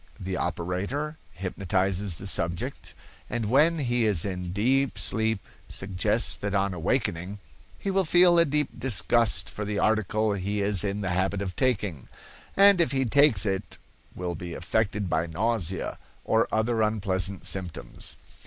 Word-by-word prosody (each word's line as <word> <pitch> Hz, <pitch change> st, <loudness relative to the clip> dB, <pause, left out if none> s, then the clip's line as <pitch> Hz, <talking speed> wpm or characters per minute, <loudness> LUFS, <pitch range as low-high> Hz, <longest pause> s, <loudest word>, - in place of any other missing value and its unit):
The 95 Hz, 0 st, -4 dB
operator 95 Hz, -, -3 dB, 0.2 s
hypnotizes 95 Hz, 0 st, -1 dB
the 95 Hz, -, -8 dB
subject, 85 Hz, -3 st, -2 dB, 0.3 s
and 115 Hz, -3 st, -2 dB
when 155 Hz, +5 st, +4 dB
he 120 Hz, -5 st, +1 dB
is 95 Hz, -7 st, +3 dB
in 90 Hz, -2 st, -4 dB
deep 130 Hz, +7 st, +1 dB
sleep 110 Hz, -1 st, 0 dB, 0.3 s
suggests 95 Hz, -2 st, 0 dB
that 100 Hz, 0 st, -3 dB
on 100 Hz, -1 st, +1 dB
awaking 90 Hz, 0 st, -1 dB, 0.4 s
he 195 Hz, -, -3 dB
will 195 Hz, 0 st, +2 dB
feel 175 Hz, +1 st, +5 dB
a 170 Hz, -, +5 dB
deep 150 Hz, -1 st, +1 dB
disgust 120 Hz, -1 st, +2 dB
for 105 Hz, -, -6 dB
the 105 Hz, 0 st, -3 dB
article 110 Hz, 0 st, +1 dB
he 100 Hz, +1 st, -2 dB
is 100 Hz, -2 st, +2 dB
in 100 Hz, 0 st, -2 dB
the 95 Hz, -2 st, -2 dB
habit 95 Hz, +2 st, 0 dB
of 95 Hz, -2 st, -5 dB
taking, 105 Hz, -, -1 dB, 0.5 s
and 200 Hz, -2 st, +6 dB
if 165 Hz, -, +1 dB
he 135 Hz, -1 st, +1 dB
takes 130 Hz, -5 st, +4 dB
it 95 Hz, -2 st, -3 dB, 0.4 s
will 90 Hz, -1 st, -3 dB
be 85 Hz, 0 st, -7 dB
affected 105 Hz, +2 st, -1 dB
by 80 Hz, 0 st, 0 dB
nausea, 95 Hz, +1 st, -1 dB, 0.3 s
or 110 Hz, +1 st, +2 dB
other 110 Hz, +1 st, +1 dB
unpleasant 100 Hz, -3 st, 0 dB
symptoms. 90 Hz, -4 st, -2 dB
100 Hz, 150 wpm, -26 LUFS, 95-120 Hz, 0.5 s, and